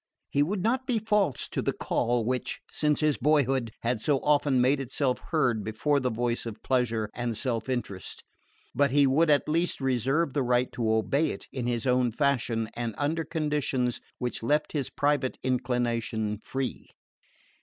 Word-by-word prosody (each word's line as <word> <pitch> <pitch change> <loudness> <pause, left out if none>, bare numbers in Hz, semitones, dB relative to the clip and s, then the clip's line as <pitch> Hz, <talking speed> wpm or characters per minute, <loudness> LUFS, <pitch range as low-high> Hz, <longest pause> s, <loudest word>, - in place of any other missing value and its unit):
He 140 - +2
would 185 +5 0
not 260 +3 0
be 245 -3 +1
false 210 - +1
to - - -2
the - - 0
call 120 -1 0
which, 125 +1 -2
since 150 0 +1
his 155 -2 +2
boyhood, 135 -4 +2
had 115 -1 0
so 145 +1 +3
often 145 -3 +3
made 130 +3 +3
itself 135 0 -1
heard 125 -10 +1
before 110 +8 +1
the 130 -1 0
voice 120 +1 -2
of 110 - -8
pleasure 115 -4 +1
and 120 -2 -3
self 120 -2 -2
interest; 110 -7 -4 0.5
but 140 +2 +3
he 140 +2 +4
would 150 +5 +3
at 145 -1 +3
least 165 +3 0
reserve 135 +3 +1
the 145 - +1
right 125 0 +1
to 115 -2 -1
obey 135 +8 +2
it - - -6
in 125 -3 -3
his 120 -2 -1
own 125 -1 +2
fashion 120 -4 0
and 120 -2 -3
under 155 +3 0
conditions 150 -6 -1 0.2
which 125 -1 -3
left 150 +6 +1
his 140 -4 -2
private 145 -2 0
inclination 120 -4 -1
free. 130 +3 -4
130 Hz, 170 wpm, -28 LUFS, 120-145 Hz, 0.5 s, he